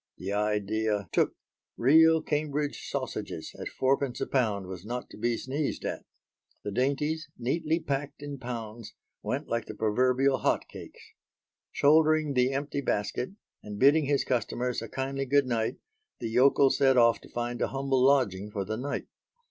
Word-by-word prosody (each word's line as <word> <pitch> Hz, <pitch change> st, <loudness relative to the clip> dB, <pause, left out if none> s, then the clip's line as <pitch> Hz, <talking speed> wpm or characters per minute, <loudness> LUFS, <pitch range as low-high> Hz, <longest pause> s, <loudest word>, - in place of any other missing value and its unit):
The 95 Hz, +2 st, -4 dB
idea 105 Hz, -1 st, 0 dB
took -, -, +1 dB, 0.4 s
"Real 160 Hz, +5 st, +5 dB
Cambridge 150 Hz, -1 st, -2 dB
Sausages" 80 Hz, -, -4 dB
at -, -, -4 dB
fourpence 135 Hz, -1 st, 0 dB
a -, -, -1 dB
pound 110 Hz, -7 st, 0 dB
was 90 Hz, -1 st, -8 dB
not 120 Hz, +3 st, -5 dB
to -, -, -11 dB
be 115 Hz, +1 st, 0 dB
sneezed 140 Hz, +3 st, -3 dB
at. -, -, -4 dB, 0.6 s
The 105 Hz, -, -4 dB
dainties, 150 Hz, -, -1 dB
neatly 155 Hz, +6 st, 0 dB
packed 145 Hz, -2 st, -4 dB
in 145 Hz, -2 st, -6 dB
pounds, 115 Hz, -3 st, -7 dB, 0.3 s
went -, -, -3 dB
like 115 Hz, -1 st, -2 dB
the 110 Hz, -, -7 dB
proverbial 130 Hz, +5 st, +2 dB
hot -, -, 0 dB
cakes. -, -, -11 dB, 0.7 s
Shouldering 155 Hz, 0 st, +4 dB
the 125 Hz, 0 st, +3 dB
empty 140 Hz, +1 st, -2 dB
basket, 125 Hz, -, -2 dB, 0.3 s
and 105 Hz, -1 st, -8 dB
bidding 145 Hz, +5 st, +5 dB
his 140 Hz, 0 st, +1 dB
customers 125 Hz, 0 st, -1 dB
a 115 Hz, -, -7 dB
kindly 135 Hz, +3 st, -3 dB
goodnight, 125 Hz, -5 st, +1 dB, 0.4 s
the 115 Hz, -, -4 dB
yokel 135 Hz, +2 st, +5 dB
set 135 Hz, -2 st, +3 dB
off 115 Hz, -1 st, +5 dB
to -, -, -15 dB
find 120 Hz, 0 st, -3 dB
a -, -, +2 dB
humble 135 Hz, -1 st, 0 dB
lodging 105 Hz, -8 st, +2 dB
for 100 Hz, -2 st, -3 dB
the 110 Hz, +3 st, -3 dB
night. 140 Hz, +4 st, -3 dB
130 Hz, 155 wpm, -28 LUFS, 110-140 Hz, 0.7 s, Real